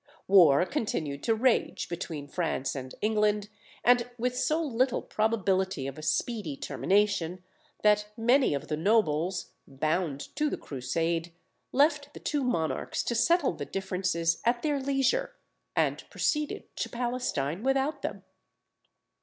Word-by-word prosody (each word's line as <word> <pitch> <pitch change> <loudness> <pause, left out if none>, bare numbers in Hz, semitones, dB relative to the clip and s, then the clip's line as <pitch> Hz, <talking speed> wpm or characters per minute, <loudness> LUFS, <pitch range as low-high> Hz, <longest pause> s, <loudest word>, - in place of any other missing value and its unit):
War 180 -6 +6
continued 155 - -2
to 225 - +3
rage 245 +1 +1
between 165 -4 -5
France 155 -5 -2
and 130 -1 -6
England, 210 -1 +1 0.3
and 245 0 +4
with 250 +1 -1
so 305 +5 +1
little 255 -5 0
probability 190 -8 0
of 135 +2 -6
a - - -7
speedy 165 - -1
termination, 185 -3 0 0.4
that 210 0 +4
many 240 - +3
of 140 - -5
the 150 - -1
nobles, 180 -2 +1 0.2
bound 155 +1 -2
to 300 0 +2
the - - -3
Crusade, 165 +5 -2 0.4
left 290 0 +2
the - - -7
two 290 -2 -1
monarchs 165 -11 -1
to - - -1
settle 330 +6 +3
the - - -5
differences 180 -3 -1
at 240 +1 +1
their 295 -2 +1
leisure, 280 - 0 0.4
and - - +1
proceeded 300 -1 -1
to - - -2
Palestine 240 - -2
without 270 +4 0
them. - - -4
210 Hz, 135 wpm, -29 LUFS, 165-250 Hz, 0.4 s, War